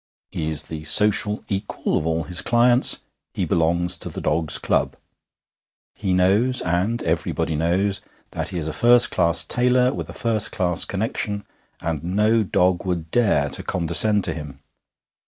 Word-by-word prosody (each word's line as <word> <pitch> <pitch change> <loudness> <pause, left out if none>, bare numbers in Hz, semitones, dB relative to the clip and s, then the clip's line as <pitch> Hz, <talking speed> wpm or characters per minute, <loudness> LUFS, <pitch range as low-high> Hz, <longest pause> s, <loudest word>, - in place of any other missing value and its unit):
He 80 - -4
is 75 -2 +2
the 80 -1 -8
social 105 +4 +3
equal 100 0 -3
of 80 - -1
all 80 0 -1
his 90 0 -3
clients. 120 +1 +2 0.3
He - - -1
belongs 85 +2 0
to - - -5
the - - -7
dogs' 75 0 -1
club. - - -1 1.0
He 95 -3 -3
knows, 100 +8 +2
and 90 +7 -1
everybody 80 -1 -1
knows, 90 +6 0 0.3
that - - -4
he 90 - -5
is 80 -2 -3
a 80 - -4
first 120 0 +5
class 85 -2 +3
tailor 125 +1 +2
with - - -6
a - - -8
first 110 -3 +1
class 90 -2 -1
connection, 105 0 -3 0.4
and 80 -3 -3
no 105 +6 +1
dog 90 -3 +1
would 85 -4 -4
dare 100 -12 +2
to - - -1
condescend 90 +4 +1
to 80 - +1
him. 75 -3 -9
90 Hz, 160 wpm, -22 LUFS, 80-105 Hz, 1.0 s, first